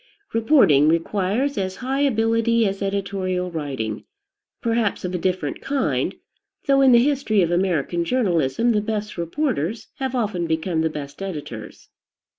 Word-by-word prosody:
Reporting 220 - +5
requires 200 - 0
as 190 -1 -2
high 265 +2 -2
ability 230 -3 +2
as 195 0 -2
editorial 190 -2 -2
writing; 135 -9 -4 0.6
perhaps 230 -5 0
of 180 - -3
a 180 - -1
different 180 -5 -2
kind, 275 -1 -1 0.5
though 275 -1 +4
in 265 -1 +6
the 240 - +7
history 265 -8 +2
of 170 - 0
American 175 -2 0
journalism 200 - +1
the 210 -2 +2
best 210 -1 -3
reporters 215 - -2
have 265 -1 -2
often 205 -8 -1
become 160 +1 0
the 160 - +1
best 145 +1 -8
editors. 145 - -7
195 Hz, 140 wpm, -22 LUFS, 165-230 Hz, 0.6 s, the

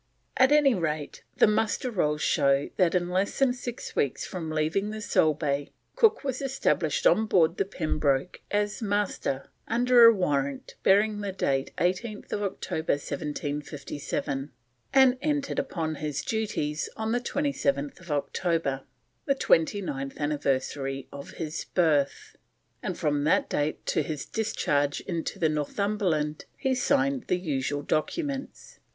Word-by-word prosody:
At 260 +2 +5
any 295 -3 +5
rate, 155 -6 -3 0.2
the - - +7
Muster 220 +3 +1
Rolls 150 -7 0
show 140 0 +2
that 180 -1 +3
in 175 -1 +1
less 190 +2 0
than 270 -2 +3
six 245 -1 -7
weeks 140 - 0
from 170 -4 -5
leaving 155 +6 0
the 215 0 -5
Solebay, 150 -7 +1 0.3
Cook 445 -6 +4
was 265 -2 -2
established 270 - 0
on 220 - +4
board 170 -3 +3
the 195 - +1
Pembroke 155 -4 -1
as 205 +3 -1
Master, 205 -10 -1 0.2
under 240 +1 +6
a 230 - +10
warrant 140 - -1
bearing 205 +2 +3
date 135 -7 0
18th 205 +5 -2
October 195 -5 -1
1757, 145 -1 -4 0.4
and 260 -1 +5
entered 290 -2 0
upon 160 -3 -2
his 150 -1 -3
duties 205 -9 -2
on 220 0 -2
27th 185 - -1
October, 150 -1 -1 0.4
the 275 - +2
twenty 200 -4 +2
ninth 135 -5 -5
anniversary 135 -2 -1
of 140 0 -8
his 160 -1 -4
birth; 150 -6 +1 0.5
and - - -3
from 145 -1 0
that 155 - +3
date 145 +1 -2
to - - +1
his 155 -4 -4
discharge 145 -10 0
into 170 -3 -4
the 160 - +2
Northumberland 155 0 -1
he 265 -2 0
signed 275 0 +1
the 180 - +2
usual 145 -4 -2
documents. 275 - -3
170 Hz, 135 wpm, -27 LUFS, 145-220 Hz, 0.5 s, a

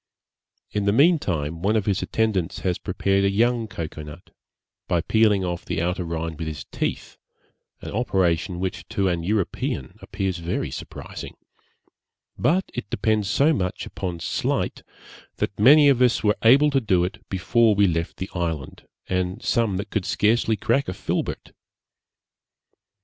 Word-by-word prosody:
In 105 -1 -1
the 100 - +3
meantime 95 - +2
one 105 +4 +2
of 105 -3 +1
his 100 -3 0
attendants 100 -6 -1
has 90 -2 -1
prepared 100 0 0
a 100 - +3
young 115 +3 +1
cocoa 80 -5 -6
nut, 75 +3 -11 0.6
by 85 - +1
peeling 105 -1 +3
off 90 0 -3
the 90 - -3
outer 90 +2 -1
rind 80 -1 -4
with 80 - -3
his 75 -3 -5
teeth, - - -4 0.6
an - - -7
operation 90 -6 0
which 95 +3 -4
to 100 -1 0
an 85 -1 -1
European 90 - -2
appears 95 -3 -3
very 85 +1 -3
surprising; - - -8 1.0
but 185 +5 +2
it 125 - -5
depends 110 -2 0
so 145 +10 +3
much 90 -9 -2
upon 90 -3 -5
sleight, - - -1 0.5
that 100 - -3
many 145 +7 +7
of 135 -3 +4
us 125 -2 +3
were 105 -1 +2
able 140 +6 +6
to 135 -1 +2
do 95 -6 +2
it 100 +5 -4
before 110 +4 +3
we 100 0 +4
left 85 -2 -1
the 95 - -5
island, 80 -6 -4 0.2
and 90 0 -2
some 115 -6 +1
that 100 +1 -5
could 105 -5 -1
scarcely 110 +1 +2
crack 140 +6 +1
a 90 - -4
filbert. - - -3
95 Hz, 155 wpm, -24 LUFS, 85-110 Hz, 1.0 s, many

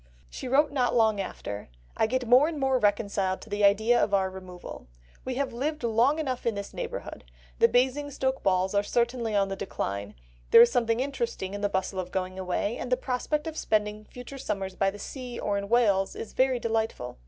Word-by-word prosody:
She - - -6
wrote 285 +3 +3
not 255 -4 +1
long 220 -3 +3
after, 100 - -6 0.3
"I 220 - +2
get 255 +1 -1
more 255 +5 +6
and 320 -3 -4
more 265 -1 +2
reconciled 200 -3 +1
to 220 - -13
the 205 0 -1
idea 220 +4 +4
of 200 - +2
our 190 -1 +1
removal. 185 - -10 0.4
We 255 - -3
have 275 -1 -2
lived 300 +6 -3
long 235 +6 +3
enough 260 -6 -2
in 230 - +1
this 200 0 -6
neighbourhood; - - -6 0.4
the - - +7
Basingstoke 265 +1 0
balls 185 0 +1
are 200 - +3
certainly 235 0 0
on 195 -1 +2
the 195 - -3
decline; 100 - -4 0.3
there - - +9
is 240 - +3
something 230 -2 +1
interesting 235 -8 -3
in 205 - -5
the 205 - +1
bustle 190 0 -2
of 180 -1 -4
going 185 0 -3
away, 190 +4 -1
and 250 - -5
the 250 - +4
prospect 265 +4 -2
of 320 -1 -5
spending 215 -4 -1
future 250 +4 -10
summers 195 -5 -3
by 195 - +2
the 200 - -8
sea 250 +2 -7
or 205 - -1
in 200 0 -3
Wales 205 -5 +3
is 225 - -7
very 260 -1 +2
delightful. 225 - -2
225 Hz, 205 wpm, -27 LUFS, 195-255 Hz, 0.4 s, there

